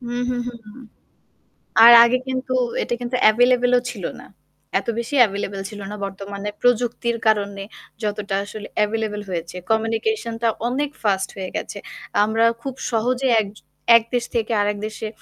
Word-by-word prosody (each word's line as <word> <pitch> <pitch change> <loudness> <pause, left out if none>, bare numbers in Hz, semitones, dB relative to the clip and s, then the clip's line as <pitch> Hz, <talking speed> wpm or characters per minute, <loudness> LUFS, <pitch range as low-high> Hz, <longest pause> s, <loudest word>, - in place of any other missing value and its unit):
হু, 240 -1 -7 0.2
হু, 250 - -1
হু, 245 - -4
হু। 210 +4 -12 1.1
আর 235 - +11
আগে 235 +2 +3
কিন্তু 260 0 -2 0.3
এটা - - -3
কিন্তু 245 +1 -3 0.2
available 245 +2 +3
ও - - +4
ছিল - - -9 0.2
না। - - -12 0.5
এত - - -12
বেশি 235 +5 -3
available 200 -1 -4
ছিল 210 - -9
না - - -5
বর্তমানে 200 +1 -6
প্রযুক্তির 240 -1 +1
কারণে 200 -2 +1 0.4
যতটা 205 -1 -2
আসলে 205 +1 -8 0.2
available 210 -1 -3
হয়েছে। 170 0 -4 0.2
communication 225 - 0
টা 235 - +2 0.2
অনেক 280 +4 -1
ফাস্ট 195 -2 +1
হয়ে 190 -1 -4
গেছে। - - -4 0.5
আমরা 220 +2 +1 0.2
খুব 270 +1 -5 0.2
সহজে 245 +3 0 0.7
এক 230 - +6
দেশ 245 -1 +1
থেকে 230 0 0
আরেক 205 0 0
দেশে 215 0 -6
225 Hz, 155 wpm, -21 LUFS, 205-245 Hz, 1.1 s, আর